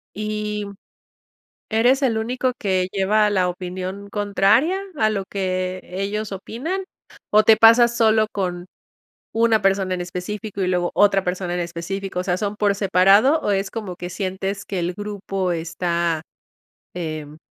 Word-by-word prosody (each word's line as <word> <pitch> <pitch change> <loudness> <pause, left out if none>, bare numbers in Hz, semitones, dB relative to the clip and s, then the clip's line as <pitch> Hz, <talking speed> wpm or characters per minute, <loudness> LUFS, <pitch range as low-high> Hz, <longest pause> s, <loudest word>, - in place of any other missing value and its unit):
¿Y 210 0 -3 1.0
eres 245 +5 +3
el 235 -5 +1
único 250 +3 -1
que 185 -3 0
lleva 210 +2 +2
la 185 -3 +1
opinión 185 +2 -6
contraria 205 - +2 0.2
a 215 -5 +3
lo 200 -2 -2
que 185 -1 -2
ellos 200 +3 -4
opinan? 260 - -4 0.5
¿O 215 +1 +5
te 220 0 +6
pasas 235 +1 +6
solo 220 -1 +3
con 180 -2 -3 0.7
una 225 -1 +3
persona 195 -1 +1
en 180 - -3
específico, 195 +4 -5
y 185 - +1
luego 180 -1 0
otra 195 -2 +4
persona 180 0 -2
en 180 - -1
específico? 180 +3 -4
O 180 - -1
sea, 180 -1 0
¿son 205 0 -2
por 205 -1 +2
separado, 195 - +4
o 205 - 0
es 195 0 0
como 205 -6 -6
que 175 0 -6
sientes 195 +1 -4
que 190 -2 -3
el 175 +1 -1
grupo 195 -2 -3
está, 170 -1 -1 0.7
em, 155 -3 -5
195 Hz, 150 wpm, -22 LUFS, 180-215 Hz, 1.0 s, te